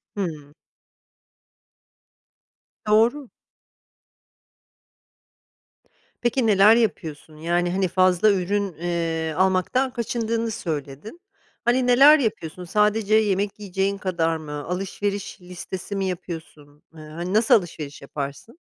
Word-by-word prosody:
Hıı. 155 -7 -5 2.3
Doğru. 235 +6 +3 2.9
Peki, 240 0 +1
neler 210 +1 +6
yapıyorsun? 160 -8 -2
Yani, 175 +2 0
hani, 190 0 +1
fazla 185 +3 +3
ürün, 200 0 -1
eee, 165 -1 -2
almaktan 190 +8 +1
kaçındığını 230 -1 -2
söyledin. 155 - -6 0.4
Hani, 245 +1 +2
neler 275 +5 +7
yapıyorsun? 180 - -3
Sadece 210 +3 +2
yemek 205 -1 +1
yiyeceğin 195 0 -2
kadar 170 -4 -1
mı? 155 -2 -9 0.2
Alışveriş 195 +2 -4
listesi 180 +2 -7
mi 195 - -1
yapıyorsun? 160 -5 -7
Iıı, 155 -1 -12
hani, 175 +4 -5
nasıl 220 +2 +4
alışveriş 155 -7 -3
yaparsın? 140 - -7
190 Hz, 95 wpm, -23 LUFS, 165-215 Hz, 2.9 s, neler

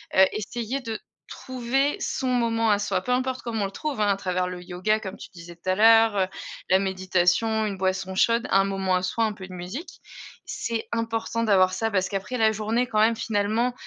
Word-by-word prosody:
heu, 190 - +8
essayer 235 +4 -3
de 225 -4 -5 0.3
trouver 260 +3 -1
son 265 - -2
moment 230 -2 +1
à 205 - +4
soi, 205 - -1
peu 250 - -1
importe 255 0 -1
comment 230 -2 -3
on - - +1
le 195 - -5
trouve, 290 -1 -4
hein. 205 - +3
À 195 - +2
travers 185 -1 -1
le 180 -1 -7
yoga 185 +5 0
comme 190 -2 -7
tu - - -10
disais 170 -1 -11
tout 175 +2 -6
à 185 - +3
l'heure, 225 0 +6
heu, 185 - +2 0.4
la 185 - +6
méditation, 190 +3 +1
une 200 -2 -3
boisson 190 0 -1
chaude, 230 +4 +2
un 195 0 +4
moment 195 -1 0
à 180 - +1
soi, 225 +5 -1
un 220 - +1
peu 190 -2 -10
de 185 - -11
musique. 185 - -7 0.4
C'est 230 -1 -4
important 230 0 -2
d'avoir 185 -3 +4
ça 225 +3 -1
parce 190 -3 0
qu'après, 195 +6 -3
la 220 -2 +4
journée 220 +3 0
quand 215 -3 -1
même 225 +2 +4
finalement, 225 +2 0
215 Hz, 215 wpm, -25 LUFS, 190-230 Hz, 0.4 s, heu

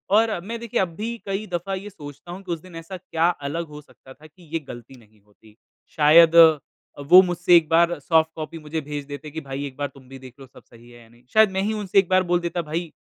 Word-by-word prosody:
और 220 -4 +2
मैं 230 +1 -5
देखिए 235 -2 -3
अब 185 - -1
भी 230 +4 -5
कई 195 +2 -3
दफ़ा 175 +3 -3
ये 200 +2 -8
सोचता 145 -2 -12
हूँ 190 +2 -8
कि 180 - -7
उस 165 - -6
दिन 185 -1 -15
ऐसा 165 +3 -8
क्या 170 -2 -1 0.2
अलग 165 +2 -4
हो 150 0 -11
सकता 130 -2 -18
था 155 +4 -17
कि 175 +3 -22
ये 165 - 0
गलती 120 +2 -11
नहीं 105 -2 -24
होती? 105 +1 -24 0.4
शायद 160 +2 +6 0.7
वो 185 +1 +10
मुझसे 175 0 +2
एक 160 -2 +1
बार 170 +1 +3
सॉफ्ट 160 +2 +2
कॉपी 160 +1 -7
मुझे 155 +1 -5
भेज 145 0 -6
देते 145 +1 -9
कि 160 +1 -6
भाई 135 +1 -6
एक 130 - -13
बार 145 0 -2
तुम 135 -2 -18
भी 135 0 -11
देख 130 -2 -13
लो 135 - -12
सब - - -18
सही 120 0 -19
है 120 0 -16
या 115 - -21
नहीं। 120 +1 -24
शायद 215 -2 +5
मैं 190 - -1
ही 215 +2 -1
उनसे 200 -2 +1
एक 185 - 0
बार 185 0 +3
बोल 175 - +2
देता 170 0 -3
भाई 165 +2 -4
165 Hz, 260 wpm, -23 LUFS, 145-185 Hz, 0.7 s, वो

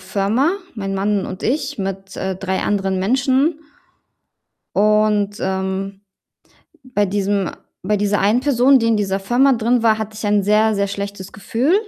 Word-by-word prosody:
Firma, 200 - 0 0.2
mein 195 -3 -4
Mann 200 0 0
und 185 - -7
ich 285 0 -1
mit, 195 0 -5
äh, 190 0 -2
3 190 0 -3
anderen 195 -2 0
Menschen. 265 - +1 1.2
Und, 210 -1 +2
ähm, 190 +1 -3 0.8
bei 225 -6 0
diesem 200 -1 -1 0.3
bei 210 +3 0
dieser 205 0 +1
einen 210 +5 +3
Person, 265 0 +4
die 230 - 0
in 225 -1 +2
dieser 195 -1 -1
Firma 250 +7 +3
drin 235 +1 +1
war, 220 -1 +3
hatte 215 0 -5
ich 220 - -5
ein 205 0 +2
sehr, 215 +2 +3
sehr 200 -1 0
schlechtes 200 -1 -6
Gefühl 235 - -1
205 Hz, 155 wpm, -19 LUFS, 195-230 Hz, 1.2 s, Person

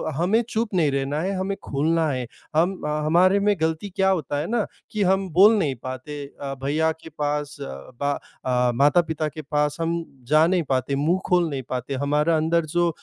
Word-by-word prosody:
हमें 185 +9 +2
चुप 220 -2 -2
नहीं 160 -5 +3
रहना 140 +2 -1
है 195 +2 -1
हमें 195 +1 -2
खुलना 160 +3 +1
है। 130 -1 -2 0.3
हम 175 +4 +2
हमारे 165 +6 +3
में 205 +1 +2
गलती 160 +5 -1
क्या 190 0 +3
होता 155 -6 0
है 150 - -2
ना 235 -3 +1 0.3
कि 210 -1 0
हम 190 +1 +2
बोल 205 +5 +7
नहीं 150 -8 0
पाते 140 +3 -6 0.2
अ, 140 -1 -3
भईया 155 +3 +1
के 160 0 -11
पास 150 -1 -2
बा 120 - -4 0.3
अ, 125 -1 +2
माता-पिता 155 +3 +2
के 155 +1 -8
पास 150 0 -1
हम 165 +1 -1 0.2
जा 155 +3 +5
नहीं 180 -1 +2
पाते, 135 +1 0
मुँह 165 +7 +1
खोल 175 -3 +2
नहीं 135 -2 -4
पाते 130 +2 -3
हमारा 150 +4 +1
अंदर 165 +1 +1
जो 175 +2 +1
155 Hz, 190 wpm, -24 LUFS, 140-175 Hz, 0.3 s, बोल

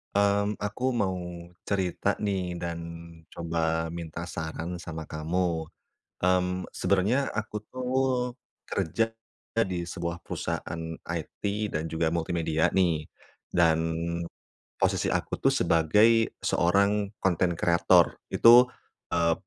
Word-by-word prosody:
Mmm, 100 +1 +2
aku 105 +4 -5 0.2
mau 95 -2 +1 0.6
cerita 95 -2 -1 0.2
nih 90 -3 -1
dan 85 -1 -4 0.5
coba 85 -1 -5 0.4
minta 85 0 -5
saran 85 +1 -5
sama 80 -2 -6
kamu, 80 +1 -1 0.5
mmm, 90 0 +1
sebenernya 100 +8 +2
aku 110 0 -4
tuh, 130 +2 -6 0.8
kerja 100 +8 +1 0.7
di 85 -1 -3
sebuah 85 -1 -4
perusahaan 80 - -4 0.4
IT 80 - -11 0.3
dan 80 +2 -2
juga 80 0 0
multimedia 85 -1 +1
nih, 85 -5 +2 0.4
dan, 85 -2 +3 1.0
posisi - - +2
aku - - -1
tuh - - +3
sebagai 105 +8 +4
seorang 100 +3 +2
konten 90 -1 +2
kreator 85 +1 +4 0.2
itu, 120 +2 +8 0.5
eee 85 -1 +3
90 Hz, 105 wpm, -28 LUFS, 85-100 Hz, 1.0 s, itu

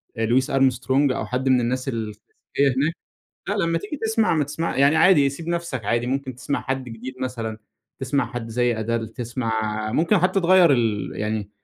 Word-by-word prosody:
ب 115 -1 -1
louis 130 +2 +3
Armstrong 135 +1 +2
أو - - -3
حد 130 +1 -1
من 125 -1 +4
الناس 130 +3 -2
الكلاسيكية 115 -4 -3 0.6
هناك، 150 +4 +1 0.6
لأ 205 - 0
لمّا 165 0 +1
تيجي 210 - -6
تسمع 220 -4 +2
ما 150 - +2
تسمع 150 +4 -3
يعني 140 +3 +4
عادي 150 -7 +5
سيب 160 +4 -8
نَفسك 170 -10 -3
عادي، 120 +3 0
ممكن 130 0 -2
تسمع 135 +3 -3
حد 135 -1 -3
جديد 120 +2 -8
مثلًا، 115 -4 -4 0.4
تسمع 135 +1 0
حد 120 -2 -5
زي 120 +1 +1
Adele 115 0 -2
تسمع 120 -1 -3 0.4
ممكن 175 - +3
حتّى 185 +2 +2
تغيّر 180 -2 +6
ال 115 -5 0
يعني 105 -1 -3
130 Hz, 180 wpm, -23 LUFS, 115-155 Hz, 0.6 s, تغيّر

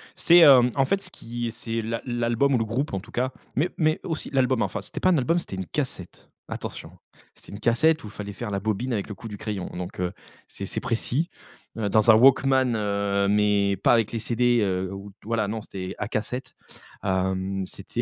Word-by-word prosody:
C'est, 175 +1 +6
hem, 130 -6 +8
en 135 -1 +3
fait, 195 +8 0
ce - - -10
qui 120 0 -5
c'est 115 0 -3
l'al 115 +1 -3
l'album 120 +2 +1
ou - - +4
le 115 - 0
groupe 125 +5 -2
en 95 - -1
tout 95 - -14
cas, 130 +2 -1 0.2
mais 155 +7 +1
mais 155 -1 +2
aussi 160 -3 -4
l'album 130 -3 +2
enfin, - - -2
c'était - - -7
pas 185 - +3
un 175 - +4
album, 165 +7 +2
c'était 100 - -6
une 95 0 -4
cassette, 110 - -5 0.2
attention. - - -6 0.4
C'est - - -13
une 100 - -7
cassette 155 +8 +2
où - - -7
il - - -10
fallait 100 -1 -7
faire 110 +1 -5
la 100 - -1
bobine 110 +5 -2
avec 105 -2 -2
le 105 - -6
coup 115 - -9
du 105 -2 -7
crayon. 105 -3 -4
Donc, 90 0 -6
heu, 90 -1 -1 0.3
c'est - - -7
c'est - - -3
précis, 135 +8 -1 0.5
heu, 105 -2 -1
dans 110 +2 +5
un - - +7
walkman 130 0 +5
heu, 100 -1 0
mais 100 -1 +2
pas 100 - +3
avec 115 -3 +2
les 115 - -2
CD, 120 +2 +2
heu, 95 -2 -1
où 100 +1 -8
t - - -29
voilà 110 -1 0
non, 110 +2 -3
c'était 95 -2 -7
à 105 - -2
cassettes, 125 +4 -4 0.5
hem, 95 0 -1
c'était - - -5
115 Hz, 225 wpm, -25 LUFS, 100-130 Hz, 0.5 s, hem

